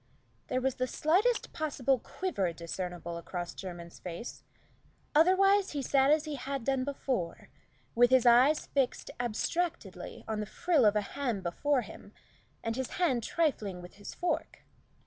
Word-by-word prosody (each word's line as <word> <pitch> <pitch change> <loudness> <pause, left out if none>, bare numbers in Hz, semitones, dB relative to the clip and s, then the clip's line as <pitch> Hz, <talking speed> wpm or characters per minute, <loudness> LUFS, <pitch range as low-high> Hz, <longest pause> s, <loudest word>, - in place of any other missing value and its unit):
There 255 - 0
was 265 0 0
the 255 - 0
slightest 380 - +1
possible 275 -5 0
quiver 220 - -2
discernible 170 0 -5
across 175 +1 -5
Jermyn's 175 -3 -8
face. 180 +6 -7 0.7
Otherwise 385 +4 +5
he 285 -2 -2
sat 270 +1 +3
as 305 +1 +4
he 300 -2 -4
had 270 0 -4
done 270 0 +1
before, 255 -10 -3 0.4
with 245 +1 +5
his 260 -1 +5
eyes 250 +6 +6
fixed 270 -3 -1
abstractedly 285 +9 -2
on 220 -1 -2
the 210 - -3
frill 310 - +2
of 210 0 +5
a 210 - +3
ham 235 -1 -3
before 255 +10 +1
him, - - -11 0.5
and 225 0 -1
his 260 -1 -3
hand 320 -10 +2
trifling 220 - 0
with 180 +2 -12
his 205 - -8
fork. 350 -1 -2
255 Hz, 150 wpm, -31 LUFS, 200-300 Hz, 0.7 s, eyes